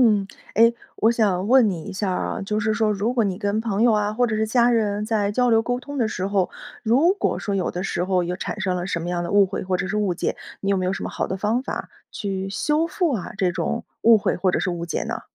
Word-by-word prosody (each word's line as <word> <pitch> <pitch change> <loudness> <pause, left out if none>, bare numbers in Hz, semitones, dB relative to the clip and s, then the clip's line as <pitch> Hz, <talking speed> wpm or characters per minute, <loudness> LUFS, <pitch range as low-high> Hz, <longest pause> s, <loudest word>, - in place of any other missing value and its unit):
嗯， 210 -4 +3 0.3
哎， 230 +2 +6 0.2
我 225 - +3
想 200 -5 +1
问 250 -2 +6
你 170 -5 -4
一 200 - -7
下 195 +1 -1
儿 180 - -1
啊， - - -3
就 210 +2 -1
是 215 +1 +1
说 220 -1 +1
如 210 +4 -1
果 240 -3 +2
你 190 -3 -1
跟 205 +1 -1
朋 220 -1 0
友 240 - +5
啊， 210 -1 +1
或 245 +3 +2
者 225 -2 -1
是 220 0 0
家 240 +2 +3
人 210 -3 0
在 210 -2 0
交 245 +2 +2
流 225 0 +5
沟 245 +2 -2
通 285 +3 -8
的 240 -5 +1
时 190 -3 -3
候， 195 -2 +1 0.3
如 270 +11 +4
果 405 - -1
说 205 - -3
有 190 -3 0
的 180 - -4
时 175 - -1
候 185 -1 +1
有 175 +1 -2
产 210 - -5
生 190 -2 0
了 180 0 -3
什 175 - -1
么 170 +1 -4
样 175 -1 -1
的 170 - -4
误 200 0 +6
会， 195 +1 -4
或 185 -1 -1
者 185 - -2
是 210 +2 -2
误 200 -4 0
解， - - -2 0.2
你 195 - -1
有 195 - +2
没 185 -1 -1
有 185 - 0
什 - - -5
么 - - -3
好 - - -2
的 190 - -3
方 215 +5 0
法 - - -5 0.2
去 195 -2 -3
修 300 +10 0
复 340 -2 0
啊， 205 -7 -4
这 185 -2 +2
种 185 +6 -2 0.2
误 230 -1 +7
会 200 - 0
或 185 +1 +1
者 - - +1
是 185 - -1
误 170 0 -4
解 165 - -2
呢？ - - -4
205 Hz, 310 characters per minute, -23 LUFS, 190-230 Hz, 0.3 s, 误